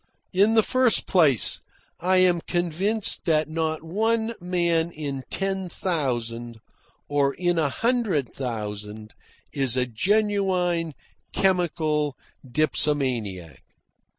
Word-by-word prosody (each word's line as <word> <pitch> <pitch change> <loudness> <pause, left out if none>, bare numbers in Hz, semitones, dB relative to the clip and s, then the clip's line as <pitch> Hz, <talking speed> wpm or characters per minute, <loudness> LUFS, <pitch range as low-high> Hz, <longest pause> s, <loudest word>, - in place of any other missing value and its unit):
In 205 +4 +4
the 220 - +5
first 255 -1 +3
place, 150 - +3 0.4
I 185 +2 +2
am 180 -2 +4
convinced 180 +6 0
that 155 -2 +2
not 160 0 -2
one 220 +6 0
man 170 -2 +1
in 145 -4 -5
ten 195 -1 -2
thousand 120 -10 -3 0.5
or 140 -1 +1
in 175 -2 +1
a 150 -3 +2
hundred 220 - 0
thousand 105 -3 -5 0.4
is 130 -3 0
a 125 - +2
genuine, 180 - 0 0.4
chemical 155 -6 +1 0.3
dipsomaniac. 125 - -1
165 Hz, 100 wpm, -25 LUFS, 135-185 Hz, 0.5 s, the